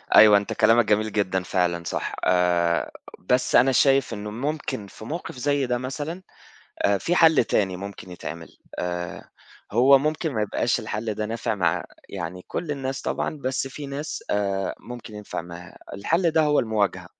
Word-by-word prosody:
أيوه 105 -1 +9
أنت 100 - -2
كلامك 115 +1 +4
جميل 105 +1 +1
جدًا 95 -3 0
فعلًا 90 -3 0
صح، 85 - -3
آآ 85 -4 +2 0.3
بس 125 +7 +1
أنا 135 +2 +6
شايف 135 -1 +3
إنه 105 -1 -5
ممكن 130 -3 -3
في 110 - -12
موقف 160 +6 -5
زي 140 +1 +1
ده 125 -1 0
مثلًا 145 +8 -5 0.6
آآ 100 0 +3
في 170 - 0
حل 160 -7 +6
تاني 95 -4 0
ممكن 100 0 -8
يتعمل، 85 -1 -8 0.2
آآ 90 -1 -4 0.4
هو 130 +5 +6
ممكن 155 +2 -1
ما 110 -4 0
يبقاش 105 - 0
الحل 110 +1 -3
ده 105 +1 -2
نافع 115 0 -2
مع 85 -3 0 0.2
يعني 90 -1 -6
كل 170 - -4
الناس 135 -2 -3
طبعًا، - - -2
بس 130 -1 -2
في 145 +2 -8
ناس 140 +2 -5
آآ 100 -1 0
ممكن 120 -3 -9
ينفع 105 -1 -5
معاها، 85 +1 -11 0.2
الحل 165 - +1
ده 160 0 +3
هو 150 -1 +3
المواجهة 110 -4 0
110 Hz, 165 wpm, -24 LUFS, 95-135 Hz, 0.6 s, أيوه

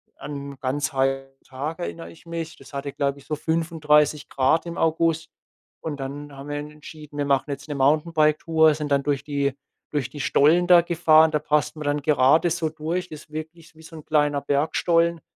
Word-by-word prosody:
an 140 -1 -7
ganz 145 +3 -2
heiße 135 0 -1
Tage 145 +5 -5
erinnere 85 0 -6
ich 85 - -18
mich. 165 -1 -5
Das - - -16
hatte, 140 0 -4
glaube 140 0 -1
ich, - - -18
so 155 - -2
35 155 -2 +1
Grad 135 +6 +2
im 170 0 -6
August. 165 0 +1 0.5
Und 150 -3 -5
dann 140 +1 -7
haben 140 +2 -9
wir 145 - -3
en 150 +1 -6
entschieden, 150 -1 -12
wir 145 - 0
machen 140 +1 +1
jetzt 140 +1 -6
'ne 145 - -3
Mountainbike-Tour, 155 +2 +3
sind 150 0 -4
dann 140 0 +2
durch 140 -2 -1
die 140 -2 -1 0.4
durch 145 -5 -2
die 145 - -10
Stollen 160 +6 +3
da 175 -1 +8
gefahren. 160 -2 +4
Da 150 - +1
passt 150 +1 0
man 150 - -6
dann 145 0 0
gerade 150 +3 +4
so 165 -1 -1
durch. 165 +4 -3
Das 155 -1 -9
ist - - -28
wirklich 160 +2 -8
wie 160 - -16
so 160 - -12
'n 155 - -10
kleiner 145 -2 +1
Bergstollen. 165 +4 +1
150 Hz, 200 wpm, -24 LUFS, 140-160 Hz, 0.5 s, da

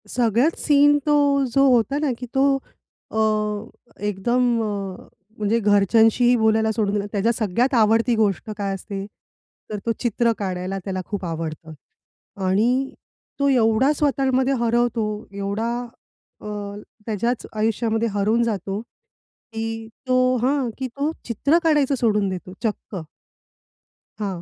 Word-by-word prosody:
सगळ्यात 245 +6 +2
सीन 290 0 +5
तो 295 -1 +3 0.4
जो 275 +2 +5
होता 240 +4 +2
ना, 295 -3 0
की 250 - -5
तो 275 +1 +4 0.6
अ, 220 - -1 0.9
एकदम 235 +4 +1
अ, - - -1 0.7
म्हणजे 215 +2 +1
घरच्यांशीही 225 +4 +4
बोलायला 220 -1 +2
सोडून 210 -2 0
दिला. 205 -1 -1
त्याच्या 210 +2 +1
सगळ्यात 235 +4 0
आवडती 225 +1 +3
गोष्ट 210 -2 0
काय 200 -1 -2
असते? 195 +1 -6 0.7
तर 210 - -2
तो 230 - +1
चित्र 235 0 +1
काढायला 185 -1 -3
त्याला 190 -2 -2
खूप 200 -3 -4
आवडतं. 160 -1 -5 0.7
आणि 240 +8 +1 0.5
तो 280 - +2
एवढा 240 +1 +3
स्वतःमध्ये 270 -2 +1
हरवतो 235 -1 +1 0.3
एवढा, 200 +3 -2 0.7
अ, - - -8 0.6
त्याच्याच 235 +2 -1
आयुष्यामध्ये 225 +1 0
हरवून 215 +4 +2
जातो, 200 -3 -2
की 225 -1 -9 0.2
तो 255 0 +3
हां, 265 -1 +1
की 265 - -3
तो 280 +5 -2
चित्र 280 +8 +2
काढायचं 295 -4 +3
सोडून 210 -5 +1
देतो 185 0 -6
चक्क. 210 -4 -3 1.2
हां, 195 -4 -3
225 Hz, 125 wpm, -22 LUFS, 205-250 Hz, 1.2 s, सीन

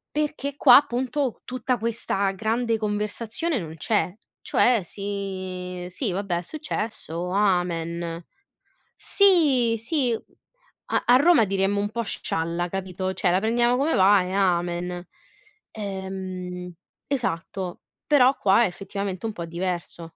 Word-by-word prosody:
Perché 295 -2 -2
qua 255 -4 +8
appunto 260 -1 -1
tutta 255 0 -2
questa 215 -3 -1
grande 225 +3 0
conversazione 215 +7 -2
non 160 -2 -7
c'è, 195 +2 0 0.2
cioè 245 -3 +3
si 185 -2 -5
sì 190 +3 -3
vabbè 195 -2 -1
è - - -2
successo, 210 - -4
amen. 170 -3 0 0.7
Sì, 290 - +4
sì, 245 0 0 0.8
a - - +1
a 245 - +7
Roma 285 -6 +5
diremmo 195 +1 +1
un 205 - -1
po' 235 +2 -3
scialla, 170 -3 -2
capito, 190 0 -3
cioè 180 0 +1
la 185 +2 +3
prendiamo 240 +3 +2
come 300 +4 +1
va 195 0 +5
e 180 +1 -5
amen. 175 -2 0 0.6
Ehm, 185 -3 -6 0.3
esatto, 190 -8 -3 0.3
però 270 -2 +5
qua 200 +4 +4
è - - +3
effettivamente 195 +2 -5
un 220 - -1
po' 170 -3 -6
diverso. 175 0 -4
200 Hz, 125 wpm, -25 LUFS, 180-240 Hz, 0.8 s, qua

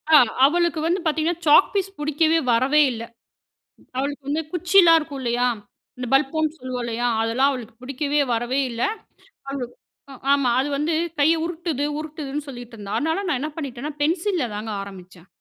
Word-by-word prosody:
ஆ, - - +11 0.3
அவளுக்கு 340 +2 +2
வந்து 350 +3 +1
பாத்தீங்கணா, 315 +2 0
chalk 300 +5 +6
piece 390 -1 -2
புடிக்கவே 310 +2 +2
வரவே 265 +6 +4
இல்ல. 230 -1 -5 0.9
அவளுக்கு 280 +2 -2
வந்து 305 +3 0
குச்சில்லாம் 355 -1 +6
இருக்கும் 290 -3 -7
இல்லையா? 245 0 +1 0.5
இந்த 250 - -4
பல்போம்ன்னு 305 +3 +1
சொல்லுவோம் 255 -2 -4
இல்லையா? 235 +1 -2 0.2
அதெல்லாம் 245 +5 +2
அவளுக்கு 240 -4 -7
புடிக்கவே 280 +3 -1
வரவே 240 +4 0
இல்ல. 235 0 -4 0.7
அவளுக்கு 255 -3 -5 0.6
ஆமா. 280 -3 +3
அது 270 +2 +1
வந்து 300 +4 0 0.3
கைய 310 +3 +4
உருத்துது 330 -4 -3
உருத்துதுன்னு 300 -2 -5
சொல்லிட்டுருந்தா. 235 -6 -7
அதுனால 320 +6 -1
நா 325 - +1
என்ன 305 +2 -3
பண்ணிட்டேன்னா, 280 -1 -5
பென்சில்ல 340 +1 +1
தாங்க 215 +1 -5
ஆரம்பிச்சேன். 185 -2 -12
285 Hz, 150 wpm, -23 LUFS, 245-320 Hz, 0.9 s, ஆ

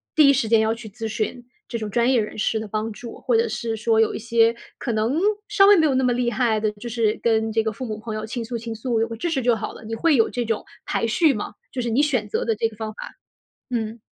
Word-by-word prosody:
第 300 -3 +7
一 280 - +6
时 240 -4 0
间 225 0 +5
要 220 +1 +2
去 225 -1 -9
咨 220 +2 -5
询 230 +3 -3 0.2
这 235 - -3
种 215 -2 -4
专 240 +4 +3
业 240 -4 +4
人 210 - -6
士 220 +1 0
的 220 - -5
帮 215 +2 -2
助。 230 +3 -9
或 475 - +1
者 460 +1 +3
是 230 -1 -3
说 225 0 +2
有 225 - +3
一 - - -4
些 230 0 +3 0.2
可 245 - -3
能， 225 +9 +1 0.3
稍 415 -1 +5
微 410 - +8
没 320 -4 +4
有 280 - +3
那 265 - +2
么 250 -1 +3
厉 240 0 0
害 235 -4 +1
的， 215 -1 0
就 215 +4 -9
是 220 -2 0
跟 225 -1 +2
这 225 0 +2
个 220 - -1
父 255 - -6
母、 215 -2 -4
朋 220 -1 -5
友 215 0 -4
倾 230 +1 -4
诉 235 0 -4
倾 230 0 -5
诉， 230 0 -1
有 225 - +1
个 230 - -6
支 345 - -2
持 290 -5 0
就 240 -1 +3
好 215 - -5
了？ - - -12
你 225 +1 -6
会 315 +6 +3
有 225 -3 +3
这 245 -2 -2
种 225 -1 -1 0.2
排 - - 0
序 285 +6 +3
吗？ 210 - -5 0.2
就 250 - -3
是 235 - -2
你 235 +5 +3
选 255 -8 +1
择 - - -1
的 225 - +1
这 225 +1 0
个 215 - -15
方 220 -1 -5
法。 - - -8 0.6
嗯。 225 -1 -3
230 Hz, 315 characters per minute, -23 LUFS, 220-245 Hz, 0.6 s, 微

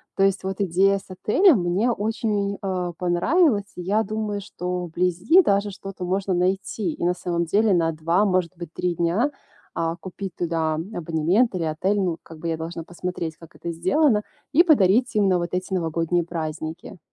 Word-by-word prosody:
То 195 - +2
есть 195 -1 +2
вот 190 +1 -3
идея 195 +2 +3
с 195 - -13
отелем 215 - +4
мне 185 +8 +1
очень, 210 -2 -1
а, 180 -3 -2
понравилась, 205 - +2
и 180 - -6
я 205 +5 +1
думаю, 215 -1 -3
что 180 -2 -4
вблизи 180 - +3
даже 200 - +1
что-то 195 -1 -7
можно 190 +1 0
найти. 185 0 -1
И - - -6
на 175 +1 +3
самом 175 -1 -2
деле, 205 +4 +3
на 165 -2 +2
2, 165 +5 +1
может 185 -3 +1
быть, 170 -2 -8
3 180 -1 -1
дня, 175 - +1 0.4
а, 165 0 -1
купить 185 +1 -7
туда 165 -2 -1
абонемент 175 +5 0
или 175 - -1
отель, 165 +6 0
ну, 175 -3 -1
как 165 -1 -12
бы, 165 +1 -3
я 160 - -1
должна 165 +1 -5
посмотреть, 175 -2 -5
как 165 -1 -15
это 170 - -5
сделано, 210 - +2 0.3
и 310 +5 +6
подарить 240 - +4
им 205 -2 +3
на 180 - +3
вот 175 0 -3
эти 185 +2 -2
новогодние 165 0 0
праздники. 160 +1 -5
180 Hz, 180 wpm, -23 LUFS, 170-205 Hz, 0.4 s, и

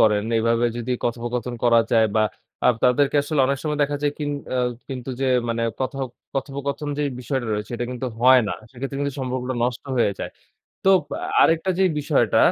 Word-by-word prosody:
করেন। 105 -2 +4 0.2
এভাবে 115 +1 +2
যদি 120 +1 -4
কথোপকথন 120 +1 -2
করা 115 -1 +6
যায়, 115 -2 +5
বা 110 - +4 0.4
আ - - +6 0.2
তাদেরকে 135 +3 +3
আসলে 145 0 0
অনেক 140 +1 0
সময় 150 -1 -2
দেখা 145 0 0
যায় 145 -1 +1
কিন 145 -1 -2 0.2
আ - - +1 0.3
কিন্তু 130 -1 -5
যে 135 - +1 0.2
মানে 115 0 -1 0.2
কথো 135 +1 -2 0.4
কথোপকথন 140 +2 -3
যেই 145 -1 0
বিষয়টা 130 0 -2
রয়েছে 105 +2 -3
এটা 120 - -2
কিন্তু 125 +1 -4
হয় 130 +1 +7
না। - - -1 0.2
সেক্ষেত্রে 135 +2 -5
কিন্তু 140 -1 -1
সম্পর্কটা 130 0 -2
নষ্ট 125 -1 -2
হয়ে 115 -4 +3
যায়। - - -4 0.5
তো 195 - +4 0.5
আরেকটা 165 +3 +3
যে - - +5 0.2
বিষয়টা 145 - +2
130 Hz, 180 wpm, -23 LUFS, 120-140 Hz, 0.5 s, হয়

